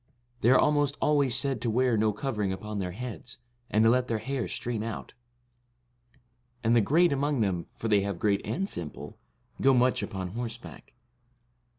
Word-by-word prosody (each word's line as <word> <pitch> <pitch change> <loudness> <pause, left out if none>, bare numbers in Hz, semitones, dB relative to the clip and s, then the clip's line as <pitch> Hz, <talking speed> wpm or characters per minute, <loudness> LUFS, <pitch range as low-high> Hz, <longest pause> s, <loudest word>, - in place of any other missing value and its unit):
They 115 - +4
are 130 - +7
almost 145 -1 +2
always 140 -5 +3
said 135 -2 +1
to 120 - 0
wear 125 +1 +2
no 110 0 +2
covering 105 -3 -2
upon 105 +2 -5
their 90 -2 -3
heads, 125 +2 -7 0.3
and 110 +1 +3
to 115 - +6
let 125 0 +2
their 115 - 0
hair 130 +3 -3
stream 120 -3 -3
out; 115 0 -6 1.5
and 115 +1 +3
the 115 - +5
great 165 - +3
among 140 -2 0
them, 90 -5 -1
for 115 - -4
they 105 -2 +4
have 100 -2 -3
great 100 +1 +1
and 195 +1 -2
simple, 75 - -6 0.4
go 135 0 +5
much 125 -1 +3
upon 95 -2 -4
horseback. 115 +3 -7
115 Hz, 175 wpm, -28 LUFS, 105-130 Hz, 1.5 s, are